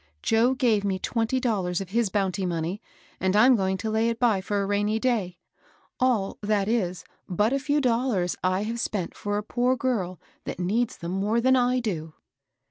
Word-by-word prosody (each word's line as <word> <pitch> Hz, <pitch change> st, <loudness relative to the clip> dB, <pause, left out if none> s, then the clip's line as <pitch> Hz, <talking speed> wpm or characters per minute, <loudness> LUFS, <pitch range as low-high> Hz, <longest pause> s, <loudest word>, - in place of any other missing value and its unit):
Joe 235 Hz, +4 st, +3 dB
gave 230 Hz, -5 st, +2 dB
me 195 Hz, -2 st, 0 dB
twenty 230 Hz, +5 st, -1 dB
dollars 195 Hz, -8 st, 0 dB
of 195 Hz, -3 st, -6 dB
his 225 Hz, +1 st, +1 dB
bounty 195 Hz, -1 st, -1 dB
monqr, 175 Hz, +2 st, -2 dB, 0.4 s
and 190 Hz, +1 st, +1 dB
I'm 245 Hz, +5 st, +6 dB
going 190 Hz, -2 st, 0 dB
to 220 Hz, +3 st, -3 dB
lay 220 Hz, +1 st, +2 dB
it 230 Hz, 0 st, -3 dB
by 225 Hz, -6 st, +3 dB
for 205 Hz, +2 st, -1 dB
a 200 Hz, -, 0 dB
rainy 205 Hz, +2 st, 0 dB
day; 220 Hz, -8 st, -1 dB, 0.6 s
all, 240 Hz, -6 st, +1 dB
that 205 Hz, -1 st, +1 dB
is, 185 Hz, -7 st, -1 dB, 0.3 s
but 210 Hz, +7 st, +1 dB
a 275 Hz, -, +1 dB
few 290 Hz, +1 st, +1 dB
dollars 235 Hz, -8 st, +1 dB
I 185 Hz, +2 st, +1 dB
have 230 Hz, +2 st, -3 dB
spent 200 Hz, -6 st, -3 dB
for 205 Hz, 0 st, -2 dB
a 210 Hz, -, -2 dB
poor 245 Hz, +4 st, +1 dB
girl 210 Hz, -, -2 dB, 0.3 s
that -, -, -5 dB
needs 215 Hz, +7 st, 0 dB
them 170 Hz, +1 st, -5 dB
more 205 Hz, +5 st, +1 dB
than 260 Hz, +2 st, +4 dB
I 250 Hz, 0 st, +2 dB
do." 160 Hz, -8 st, -4 dB
210 Hz, 195 wpm, -26 LUFS, 190-240 Hz, 0.6 s, I'm